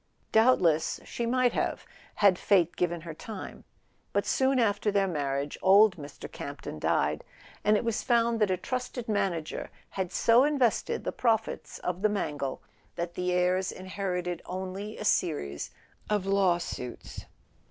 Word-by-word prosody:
Doubtless 185 Hz, -9 st, +4 dB
she 235 Hz, -, -3 dB
might 250 Hz, 0 st, +2 dB
have, -, -, -1 dB, 0.3 s
had 195 Hz, -3 st, +4 dB
fate 175 Hz, -4 st, +3 dB
given 175 Hz, -1 st, -1 dB
her 165 Hz, 0 st, -7 dB
time; 205 Hz, +5 st, -8 dB, 0.5 s
but -, -, +1 dB
soon 265 Hz, 0 st, +2 dB
after 210 Hz, -3 st, +2 dB
their 200 Hz, -1 st, +2 dB
marriage 140 Hz, -4 st, -2 dB
old 200 Hz, +1 st, +6 dB
Mr. 145 Hz, -2 st, -9 dB
Campton 140 Hz, -, -7 dB
died, -, -, +1 dB, 0.4 s
and 210 Hz, 0 st, +4 dB
it -, -, -2 dB
was 230 Hz, -1 st, 0 dB
found 235 Hz, -1 st, +2 dB
that 210 Hz, -2 st, +3 dB
a 185 Hz, -, +1 dB
trusted 250 Hz, +3 st, -4 dB
manager 195 Hz, -7 st, -1 dB, 0.2 s
had 190 Hz, -2 st, -3 dB
so 230 Hz, +5 st, +5 dB
in¬ 295 Hz, +1 st, +2 dB
vested 265 Hz, -, +1 dB
the -, -, -2 dB
profits 225 Hz, -2 st, -1 dB
of 180 Hz, +1 st, -3 dB
the 215 Hz, -, +3 dB
Mangle 145 Hz, -9 st, -3 dB, 0.3 s
that 170 Hz, 0 st, -3 dB
the 180 Hz, 0 st, -1 dB
heirs 180 Hz, +1 st, +1 dB
inherited 180 Hz, -2 st, -3 dB
only 190 Hz, +3 st, -5 dB
a 215 Hz, -, -5 dB
series 145 Hz, -, 0 dB, 0.4 s
of 210 Hz, -3 st, +1 dB
law 195 Hz, -3 st, +3 dB
suits. 125 Hz, -7 st, -7 dB
190 Hz, 150 wpm, -29 LUFS, 175-220 Hz, 0.5 s, old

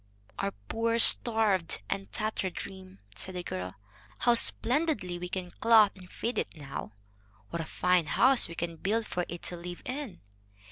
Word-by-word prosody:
"Our 100 Hz, -, -2 dB
poor 230 Hz, 0 st, -1 dB
starved 220 Hz, -, +6 dB
and 100 Hz, +1 st, -4 dB
tattered 210 Hz, -, -3 dB
dream!" 190 Hz, -, -9 dB
said 185 Hz, +11 st, -5 dB
the 180 Hz, -, -4 dB
girl. 90 Hz, -, -6 dB, 0.4 s
"How 240 Hz, -, +3 dB
splendidly 240 Hz, -, +1 dB
we 180 Hz, 0 st, -6 dB
can 180 Hz, -1 st, -5 dB
clothe 220 Hz, -1 st, +4 dB
and 185 Hz, -2 st, -15 dB
feed 235 Hz, +2 st, -3 dB
it -, -, -5 dB
now! 135 Hz, -7 st, -8 dB, 0.6 s
What 170 Hz, -, -3 dB
a -, -, -5 dB
fine 180 Hz, -1 st, +1 dB
house 260 Hz, +7 st, +3 dB
we 170 Hz, -, -9 dB
can 170 Hz, -1 st, -4 dB
build 220 Hz, +6 st, -1 dB
for 180 Hz, -3 st, -3 dB
it 175 Hz, 0 st, -8 dB
to 180 Hz, -, -2 dB
live 175 Hz, +1 st, -9 dB
in! 255 Hz, -7 st, -6 dB
185 Hz, 170 wpm, -29 LUFS, 170-225 Hz, 0.6 s, starved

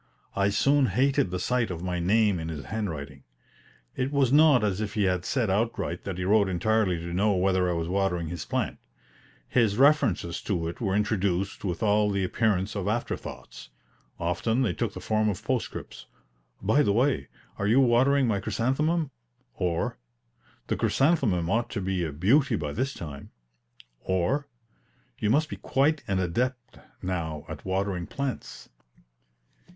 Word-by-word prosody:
I 100 Hz, 0 st, +2 dB
soon 135 Hz, +7 st, +3 dB
hated 135 Hz, -6 st, +2 dB
the 90 Hz, -, -2 dB
sight 120 Hz, +4 st, 0 dB
of 85 Hz, -1 st, -5 dB
my 90 Hz, -1 st, -2 dB
name 100 Hz, +1 st, +2 dB
in 80 Hz, 0 st, -4 dB
his 75 Hz, -3 st, -6 dB
handwriting. 75 Hz, -11 st, -5 dB, 0.7 s
It 130 Hz, +2 st, -1 dB
was 140 Hz, -3 st, +2 dB
not 150 Hz, -5 st, +6 dB
as 100 Hz, -1 st, 0 dB
if 105 Hz, 0 st, -4 dB
he 105 Hz, -3 st, +2 dB
said 115 Hz, +1 st, 0 dB
outright 100 Hz, -4 st, -1 dB
that 95 Hz, -3 st, -4 dB
he 90 Hz, -, -2 dB
wrote 100 Hz, 0 st, +4 dB
entirely 95 Hz, 0 st, +1 dB
to 85 Hz, +1 st, -6 dB
know 100 Hz, +3 st, +2 dB
whether 95 Hz, -1 st, +2 dB
I -, -, +1 dB
was 85 Hz, -1 st, -2 dB
watering 90 Hz, -2 st, 0 dB
his 85 Hz, -2 st, -5 dB
plant. -, -, -2 dB, 0.7 s
His 110 Hz, -5 st, +2 dB
references 120 Hz, -, +3 dB
to 85 Hz, -5 st, -2 dB
it 85 Hz, -, -6 dB
were 100 Hz, -4 st, 0 dB
introduced 100 Hz, -2 st, 0 dB
with 90 Hz, -2 st, -2 dB
all 105 Hz, 0 st, +3 dB
the 100 Hz, -1 st, 0 dB
appearance 100 Hz, 0 st, 0 dB
of 100 Hz, -2 st, -2 dB
after 115 Hz, +3 st, -1 dB
thoughts. -, -, -10 dB, 0.5 s
Often 100 Hz, +9 st, 0 dB
they 105 Hz, -8 st, 0 dB
took -, -, -2 dB
the -, -, -5 dB
form 110 Hz, 0 st, +1 dB
of 105 Hz, +1 st, -4 dB
postscripts: 125 Hz, +1 st, -4 dB, 0.6 s
"By 110 Hz, +9 st, +4 dB
the 100 Hz, -9 st, +2 dB
way, 115 Hz, -, +1 dB, 0.3 s
are 100 Hz, -, 0 dB
you 115 Hz, +5 st, +5 dB
watering 130 Hz, +2 st, +4 dB
my 105 Hz, -3 st, +1 dB
chrysanthemum?" 145 Hz, -, 0 dB, 0.4 s
or, 85 Hz, -7 st, -2 dB, 0.7 s
"The -, -, -2 dB
chrysanthemum 125 Hz, -, +2 dB
ought 115 Hz, +6 st, 0 dB
to -, -, -3 dB
be 95 Hz, -2 st, -1 dB
a 80 Hz, -, -2 dB
beauty 115 Hz, -, +3 dB
by 75 Hz, -2 st, -3 dB
this 130 Hz, -, -2 dB
time;" 70 Hz, -4 st, -8 dB, 0.7 s
or, 95 Hz, +11 st, 0 dB, 0.7 s
"You 105 Hz, -, 0 dB
must 150 Hz, +7 st, +3 dB
be -, -, -7 dB
quite 145 Hz, +3 st, +1 dB
an 95 Hz, -2 st, 0 dB
adept 120 Hz, +8 st, -2 dB, 0.2 s
now 80 Hz, -5 st, -3 dB
at 80 Hz, -2 st, -8 dB
watering 95 Hz, -2 st, -1 dB
plants." 140 Hz, -4 st, -5 dB
100 Hz, 165 wpm, -27 LUFS, 90-120 Hz, 0.7 s, not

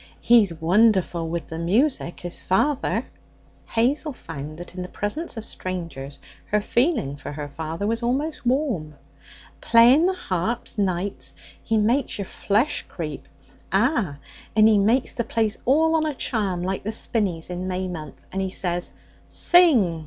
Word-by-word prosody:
He's 230 Hz, -6 st, +5 dB
wonderful 175 Hz, 0 st, +2 dB
with 170 Hz, 0 st, -4 dB
the 160 Hz, -, -5 dB
music, 190 Hz, -, 0 dB
is 175 Hz, -, -3 dB
father.' 280 Hz, +9 st, +1 dB, 0.6 s
Hazel 275 Hz, +6 st, 0 dB
found 155 Hz, -, -8 dB
that 175 Hz, +1 st, -9 dB
in 180 Hz, -, -6 dB
the 180 Hz, -, -6 dB
presence 240 Hz, +8 st, -4 dB
of 220 Hz, -, -4 dB
strangers 165 Hz, -7 st, -6 dB, 0.3 s
her 210 Hz, -, +2 dB
feeling 235 Hz, -, +1 dB
for 145 Hz, -, -7 dB
her 145 Hz, 0 st, -5 dB
father 160 Hz, +6 st, -5 dB
was 230 Hz, +2 st, -1 dB
almost 275 Hz, +6 st, -1 dB
warm. 240 Hz, -, 0 dB, 0.7 s
'Playing 245 Hz, +8 st, +6 dB
the 380 Hz, -, 0 dB
harp 230 Hz, -, -2 dB
nights, 190 Hz, 0 st, -2 dB, 0.3 s
he 225 Hz, -, 0 dB
makes 235 Hz, +6 st, +1 dB
your 200 Hz, -, -3 dB
flesh 230 Hz, +11 st, 0 dB
creep; 155 Hz, -5 st, -6 dB, 0.4 s
ah! 200 Hz, -, +1 dB, 0.4 s
and 215 Hz, 0 st, +6 dB
he 215 Hz, -2 st, +5 dB
makes 230 Hz, +6 st, +2 dB
the 235 Hz, -, -1 dB
place 220 Hz, -2 st, 0 dB
all 320 Hz, +5 st, +4 dB
on 315 Hz, -1 st, +2 dB
a 300 Hz, -, -3 dB
charm, 195 Hz, -9 st, -1 dB
like 190 Hz, +1 st, -2 dB
the 215 Hz, -, -3 dB
spinneys 195 Hz, -7 st, -1 dB
in 180 Hz, +1 st, -4 dB
May 185 Hz, 0 st, -2 dB
month. 155 Hz, -5 st, -7 dB
And 195 Hz, -, -1 dB
he 190 Hz, -, -1 dB
says, 175 Hz, -2 st, -2 dB, 0.4 s
"Sing!" 255 Hz, -, +4 dB
205 Hz, 155 wpm, -24 LUFS, 175-240 Hz, 0.7 s, Playing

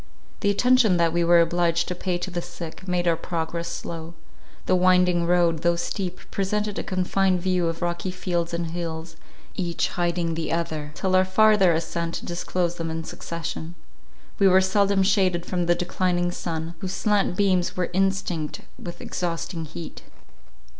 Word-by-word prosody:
The 205 Hz, -, +1 dB
attention 235 Hz, -2 st, +4 dB
that 165 Hz, -1 st, +2 dB
we 170 Hz, 0 st, +2 dB
were 170 Hz, 0 st, +6 dB
obliged 170 Hz, 0 st, +1 dB
to -, -, -2 dB
pay 180 Hz, 0 st, -2 dB
to 185 Hz, +2 st, -5 dB
the 175 Hz, 0 st, -2 dB
sick, 175 Hz, +1 st, -9 dB
made 180 Hz, -1 st, 0 dB
our 170 Hz, -, +4 dB
progress 170 Hz, 0 st, -3 dB
slow. 165 Hz, 0 st, -6 dB, 0.5 s
The -, -, +3 dB
winding 180 Hz, -1 st, +4 dB
road, 170 Hz, -2 st, +3 dB
though 170 Hz, 0 st, +3 dB
steep, 180 Hz, +1 st, -3 dB
presented 210 Hz, +1 st, -1 dB
a -, -, -3 dB
confined 185 Hz, 0 st, +1 dB
view 180 Hz, -1 st, +1 dB
of 165 Hz, +1 st, -3 dB
rocky 175 Hz, +2 st, -2 dB
fields 175 Hz, -2 st, -2 dB
and 170 Hz, -1 st, -3 dB
hills, 165 Hz, -1 st, -5 dB, 0.4 s
each 170 Hz, -3 st, -1 dB
hiding 175 Hz, -2 st, -1 dB
the 160 Hz, -1 st, -3 dB
other, 155 Hz, -3 st, -2 dB
till 185 Hz, -1 st, 0 dB
our 185 Hz, -, +6 dB
farther 195 Hz, -1 st, +5 dB
ascent 165 Hz, +1 st, -2 dB
disclosed 175 Hz, 0 st, -2 dB
them 165 Hz, 0 st, -2 dB
in 160 Hz, 0 st, -3 dB
succession. 165 Hz, 0 st, -6 dB, 0.6 s
We 200 Hz, -, +6 dB
were 190 Hz, 0 st, +6 dB
seldom 195 Hz, +1 st, +3 dB
shaded 190 Hz, -3 st, +2 dB
from 175 Hz, -2 st, -1 dB
the 175 Hz, -, +4 dB
declining 175 Hz, 0 st, 0 dB
sun, 165 Hz, -1 st, -4 dB
whose 190 Hz, +1 st, -4 dB
slant 205 Hz, -3 st, +1 dB
beams 185 Hz, -4 st, +2 dB
were 180 Hz, -1 st, -1 dB
instinct 190 Hz, -4 st, 0 dB, 0.2 s
with 175 Hz, 0 st, -8 dB
exhausting 170 Hz, -1 st, -3 dB
heat. 160 Hz, +2 st, -8 dB
175 Hz, 165 wpm, -24 LUFS, 170-185 Hz, 0.6 s, were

